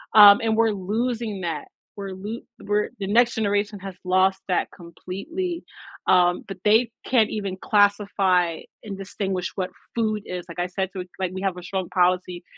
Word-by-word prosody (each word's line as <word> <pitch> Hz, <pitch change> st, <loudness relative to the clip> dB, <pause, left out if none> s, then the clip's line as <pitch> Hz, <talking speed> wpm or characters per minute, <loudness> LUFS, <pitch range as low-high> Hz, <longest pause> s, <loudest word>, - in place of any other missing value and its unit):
um, 205 Hz, -1 st, +10 dB
and 220 Hz, -1 st, +2 dB
we're 225 Hz, 0 st, +4 dB
losing 215 Hz, +1 st, -2 dB
that. 160 Hz, -4 st, -3 dB, 0.3 s
We're 195 Hz, -1 st, -5 dB
lo 210 Hz, +5 st, -6 dB, 0.2 s
we're 210 Hz, 0 st, 0 dB
the 195 Hz, -, -3 dB
next 235 Hz, +3 st, +4 dB
generation 205 Hz, -1 st, 0 dB
has 190 Hz, -1 st, -7 dB
lost 190 Hz, +1 st, +3 dB
that 180 Hz, -, +1 dB
completely, 255 Hz, -, -5 dB, 0.4 s
um, 180 Hz, -1 st, +4 dB
but 195 Hz, -2 st, -7 dB
they 220 Hz, +2 st, +4 dB, 0.2 s
can't 225 Hz, -4 st, +4 dB
even 200 Hz, -3 st, -3 dB
classify 200 Hz, -4 st, +2 dB, 0.2 s
and 200 Hz, -3 st, -6 dB
distinguish 190 Hz, -1 st, -3 dB
what 185 Hz, -2 st, -2 dB, 0.2 s
food 215 Hz, -2 st, 0 dB
is 180 Hz, -1 st, -5 dB
like 170 Hz, +1 st, -8 dB
I 175 Hz, -, 0 dB
said 190 Hz, +1 st, -2 dB
to 190 Hz, -, -5 dB
i -, -, -4 dB, 0.2 s
like 185 Hz, -1 st, -1 dB
we 190 Hz, -, -5 dB
have 190 Hz, -2 st, -1 dB
a 180 Hz, -, -8 dB
strong 190 Hz, -1 st, -3 dB
policy, 180 Hz, -1 st, +1 dB
195 Hz, 175 wpm, -24 LUFS, 185-215 Hz, 0.4 s, um